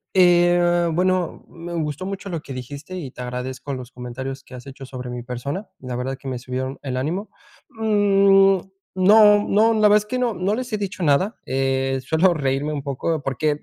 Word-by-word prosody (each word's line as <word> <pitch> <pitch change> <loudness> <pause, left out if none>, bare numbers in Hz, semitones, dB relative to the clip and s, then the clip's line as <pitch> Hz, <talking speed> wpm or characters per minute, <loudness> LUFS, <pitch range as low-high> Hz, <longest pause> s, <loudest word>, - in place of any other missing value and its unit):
Eh, 175 -1 +4
bueno, 185 0 0
me 170 +1 -8
gustó 155 0 -3
mucho 195 0 -5
lo 165 -4 -4
que 140 - -8
dijiste 140 +7 -8
y 150 -7 -5
te 125 - -10
agradezco 130 +3 -5
los 130 -1 -7
comentarios 130 +2 -6
que - - -16
has 125 +2 -10
hecho 135 0 -9
sobre 125 -1 -7
mi 120 -1 -5
persona, 140 - -5
la 125 -1 -6
verdad, 130 +2 -3
que - - -10
me 130 -2 -3
subieron 130 +2 -4
el 130 -2 -3
ánimo. 170 +11 -2 0.4
Mm, 195 -3 +4 0.4
no 210 +2 +6
no, 220 +3 +4
la 220 - 0
verdad 210 - +6
es 210 - -2
que 250 +4 -3
no, 240 -4 0
no 185 +3 0
les 250 +2 -4
he 215 - 0
dicho 195 -2 -5
nada, 165 +7 +2
eh, 135 0 0
suelo 170 +4 +3
reírme 140 0 -1
un 145 -2 -4
poco, 145 +2 -2
porque, 145 +3 0
155 Hz, 200 wpm, -22 LUFS, 130-195 Hz, 0.4 s, no